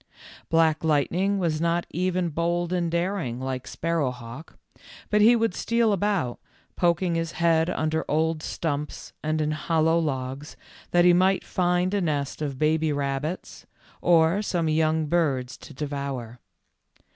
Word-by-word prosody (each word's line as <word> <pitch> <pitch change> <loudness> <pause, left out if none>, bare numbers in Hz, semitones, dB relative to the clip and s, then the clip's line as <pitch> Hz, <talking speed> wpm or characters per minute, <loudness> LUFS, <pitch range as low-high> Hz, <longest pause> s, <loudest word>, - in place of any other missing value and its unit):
Black 160 -1 +3
Lightning 170 +6 +1
was 165 -4 -1
not 170 +1 +1
even 180 0 0
bold 170 +2 -1
and 175 -2 0
dar 175 +4 0
ing 120 -7 -4
like 130 -1 -4
Sparrowhawk, 130 -4 -4 0.5
but 210 0 +4
he 230 +3 +7
would 225 -4 +1
steal 230 +2 +1
about, 195 -10 -1 0.4
poking 175 0 +1
his 165 0 -2
head 165 0 +2
under 160 -2 -1
old 160 +1 +1
stumps 150 -2 -4
and 155 +1 -1
in 155 0 0
hollow 160 +1 +1
logs, 135 -1 -4 0.3
that 175 0 +4
he 180 - +7
might 185 +2 +3
find 180 +1 +1
a 200 - +1
nest 145 -4 -2
of 140 -3 -3
baby 155 +1 +1
rabbits, 145 +4 -3 0.3
or 170 +3 +4
some 175 -5 -1
young 155 0 +1
birds 140 -6 0
to - - -13
devour. 140 -4 -5
160 Hz, 145 wpm, -25 LUFS, 150-175 Hz, 0.5 s, he